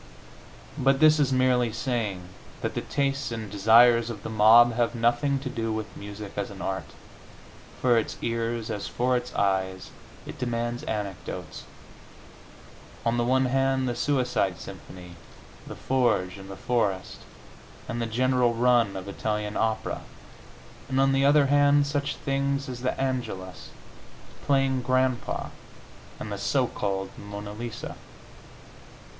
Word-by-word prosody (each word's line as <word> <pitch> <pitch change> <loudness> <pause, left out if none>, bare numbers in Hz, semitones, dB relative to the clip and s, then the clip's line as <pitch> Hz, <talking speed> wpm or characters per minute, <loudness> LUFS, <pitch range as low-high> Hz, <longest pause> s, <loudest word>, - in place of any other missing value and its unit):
But 135 0 +3
this 155 0 +6
is 140 -2 +2
merely 125 -2 +2
saying 110 -5 -2 0.4
that - - -2
the - - -2
tastes 135 -3 -1
and 110 -3 -5
desires 115 +3 +5
of 105 -4 -7
the - - -5
mob 115 +3 +7
have 120 +1 0
nothing 120 +5 +2
to 135 - -5
do 115 -3 -3
with 110 -2 -4
music 100 0 -8
as 100 - -2
an 100 - -10
art. 95 -1 -3 0.9
For 120 -2 +4
its 110 - -5
ears, 115 -1 -2
as 100 - -4
for 125 +1 0
its 125 0 -2
eyes, 95 -1 -1 0.3
it - - -9
demands 120 0 -2
anecdotes 95 -5 -5 1.4
on 115 +1 +1
the 120 - +2
one 130 +2 +2
hand 135 0 +1
the 120 - -1
Suicide 125 -8 0
symphony, 90 -1 -11 0.5
"The - - -7
Forge 110 -8 0
in 95 - -10
the 95 - -8
Forest," 100 -6 -1 0.7
and 120 +1 -3
the 115 - -1
general 125 +1 +2
run 120 -4 +3
of 95 +1 -7
Italian 105 +1 -3
opera, 110 -1 -1 0.9
and 130 0 0
on 135 0 +4
the 135 0 +2
other 145 0 +5
hand 145 +1 +4
such 145 0 -2
things 140 0 -1
as 125 -2 -6
"The 130 - -2
Angelus," 120 -9 -4 0.8
"Playing 135 -2 +2
Grandpa" 130 0 0 0.7
and 105 - -6
the 100 - -4
so 125 +6 +1
called 95 -4 -3
"Mona 105 0 -7
Lisa." 115 +1 -6
120 Hz, 140 wpm, -26 LUFS, 105-130 Hz, 1.4 s, mob